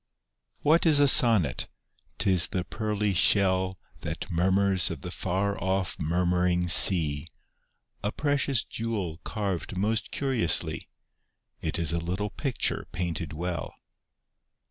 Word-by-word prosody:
What 160 +3 +2
is 150 -3 +4
a 145 - +4
sonnet? 110 - +3 0.5
T 95 - +1
is 90 -3 +1
the 90 - -3
pearly 105 0 -3
shell 95 +1 +2 0.2
That - - -6
mormnrs 95 +2 +1
of 80 -5 -7
the 90 - -7
f 90 - -7
ar 100 +2 -1
o£P 95 -1 -2
murmuring 90 +1 0
sea; 80 -5 +7 0.7
A 105 - -3
precious 140 -4 -1
jewel 100 -8 -5
carved 100 -4 -4
most 110 +3 -1
curiously; 130 -11 -1 0.7
It 80 +1 -2
is 85 -1 -1
a 85 - -1
little 95 +5 -4
picture 135 +2 -3
painted 85 -2 -4
well. 85 +2 -5
95 Hz, 125 wpm, -26 LUFS, 85-105 Hz, 0.7 s, sea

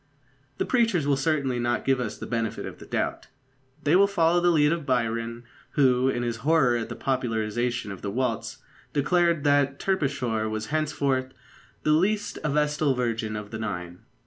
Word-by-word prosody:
The - - 0
preachers 225 - +2
will 145 -1 +3
certainly 135 -3 0
not 120 0 -1
give 135 -1 +2
us 115 -4 -3
the - - -7
benefit 115 -2 -2
of - - -8
the - - -12
doubt. - - -2 0.6
They 150 +4 +3
will 200 +2 +6
follow 175 -3 +3
the 175 - +4
lead 150 -3 +4
of 170 -2 -1
Byron, 115 -2 -1 0.3
who, 130 -2 +3
in 120 -2 -1
his 120 -1 -2
horror 135 -1 +3
at 115 -1 -3
the - - -5
popularisation 120 -2 -1
of 95 - -8
the 100 - -3
waltz, 120 +2 -2 0.4
declared 170 +1 +2
that 145 -1 +3
Terpsichore 130 - 0
was 110 0 -3
henceforth 140 -4 0 0.5
"the 155 - +2
least 200 +7 +1
a 150 - 0
vestal 150 -1 +1
virgin 115 -3 -2
of 105 -1 -6
the 110 - -5
Nine." 90 -5 -5
130 Hz, 175 wpm, -26 LUFS, 115-150 Hz, 0.6 s, will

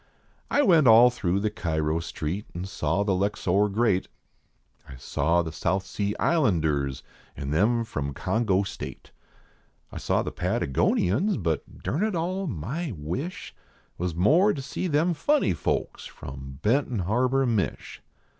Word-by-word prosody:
I 290 - +3
went 165 - +5
all 120 +2 +8
throtigh 100 -4 -1
the 105 - 0
Cairo 80 -4 -1
Street 85 +4 -4
an 90 +2 -4
saw 95 0 -1
the 100 -1 +1
Luxor 100 +1 +1
great, 100 -2 +1 0.8
I 70 - -9
saw 80 +7 0
the 80 - -5
South 95 +4 -1
Sea 100 +1 -2
Islanders 80 - +1 0.3
an 70 0 -4
them 110 +9 +2
from 70 -10 -4
Congo 105 -4 +1
State, 100 - -8 0.8
I - - -6
saw - - 0
the - - -4
Patagonians, 95 - +1
but, 85 -5 -3
durn 155 - -1
it 215 -2 0
all, 185 +3 -2
my 140 - -4
wish 140 - -5 0.5
Was 90 -2 -2
more 165 - +4
to 140 - -5
see 140 +7 -3
them 165 +2 +2
funny 285 - +2
folks - - -2
from 65 0 -9
Benton 125 +1 +1
Harbor, 125 +6 +2
Mich. 110 -7 -2
100 Hz, 145 wpm, -26 LUFS, 85-135 Hz, 0.8 s, all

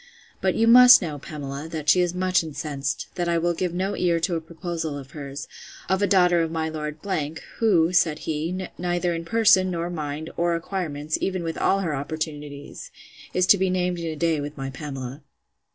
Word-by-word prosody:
But - - +1
you 225 - +3
must 250 +2 +9
know, 150 -4 -4
Pamela, 140 0 -6
that 155 -2 -5
she 180 - +6
is 175 -1 +1
much 185 -1 +2
incensed, 145 -3 -4
that 175 -1 -2
I 170 - +2
will 175 +1 +1
give 180 +1 -2
no 190 +3 -2
ear 170 -2 +1
to 175 - 0
a 165 - -2
proposal 165 -2 -5
of 135 -1 -10
hers, 140 -2 -7 0.4
of 190 +1 +1
a 205 - +3
daughter 180 -3 +4
of 165 - 0
my 160 0 -2
Lord 150 -1 -5 0.3
——, 160 - -13
who, 180 -7 +3
said 160 -4 +3
he, 170 +4 -2
neither 175 0 0
in 165 0 -4
person, 190 -3 +4
or 170 +1 -3
mind, 155 -1 -5
or 170 0 +1
acquirements, 160 -4 -3
even 185 -2 -1
with 165 -1 -3
all 195 - +2
her 165 -5 -1
opportunities, 145 0 -5 0.5
is 185 - +3
to 195 +1 +5
be 190 0 +2
named 180 -1 0
in 165 - -4
a 160 - -3
day 160 -1 +1
with 145 +1 -6
my 135 0 -4
Pamela. 135 -1 -7
165 Hz, 200 wpm, -24 LUFS, 150-180 Hz, 0.5 s, must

